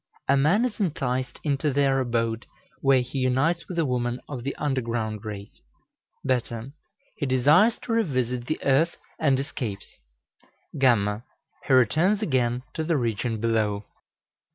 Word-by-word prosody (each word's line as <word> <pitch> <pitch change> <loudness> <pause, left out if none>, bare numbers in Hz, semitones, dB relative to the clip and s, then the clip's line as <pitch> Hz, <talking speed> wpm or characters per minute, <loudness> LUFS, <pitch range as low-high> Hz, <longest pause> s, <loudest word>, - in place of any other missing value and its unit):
A 140 - +4
man 165 - +3
is 240 -3 -4
enticed 130 - -2
into 145 0 0
their 135 -1 +2
abode, 115 -2 -1 0.3
where 135 -2 +4
he 125 +2 -4
unites 135 +7 +1
with 180 - -6
a 165 - +2
woman 125 -1 -1
of 130 -5 -6
the 140 - -3
underground 115 -6 -2
race. 100 -1 -8 0.7
β. 125 0 -2 0.4
He 145 - -2
desires 145 - +4
to - - -5
revisit 130 - 0
the 155 - -1
earth, 140 +5 +2 0.2
and 140 -4 +3
escapes. 110 - -6 0.7
γ. 110 -6 +2 0.5
He 135 - +3
returns 160 - +3
again 125 - 0
to 160 - -2
the 160 -1 +1
region 115 -2 -1
below. 105 -2 0
130 Hz, 140 wpm, -25 LUFS, 120-145 Hz, 0.7 s, A